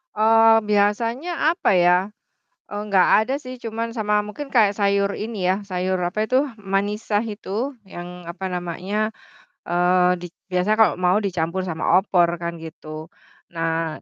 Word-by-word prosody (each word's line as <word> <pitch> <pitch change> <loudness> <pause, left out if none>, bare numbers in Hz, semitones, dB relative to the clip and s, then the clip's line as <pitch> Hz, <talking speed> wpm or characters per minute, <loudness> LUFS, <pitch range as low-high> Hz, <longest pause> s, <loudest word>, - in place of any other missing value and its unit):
Eee, 225 +1 +5
biasanya 230 +11 +1
apa 335 - +1
ya, 180 -1 +5 0.7
eee, 205 - -5
nggak 190 -2 +4
ada 255 +5 -2
sih 255 -3 -9
cuman 230 0 -4
sama 210 -2 +1
mungkin 275 +7 -7
kaya 215 -6 +4
sayur 200 -1 +1
ini 210 -4 -4
ya, 185 - +3
sayur 185 -1 -2
apa 200 +5 -1
itu, 255 +3 +3 0.2
manisa 205 +1 -1
itu, 220 +3 -4 0.2
yang 180 -1 -9
apa 185 +2 -5
namanya, 185 +5 -3 0.6
eee, 180 +1 +3
dik 175 -1 -10 0.2
biasanya 180 +3 +1
kalo 220 - +6
mau 185 +3 +2
dicampur 180 -2 -2
sama 160 -1 -3 0.2
opor 180 -4 +2
kan, 170 0 -4
gitu, 155 -1 -9 0.5
nah 165 -1 -2
200 Hz, 145 wpm, -22 LUFS, 180-220 Hz, 0.7 s, kalo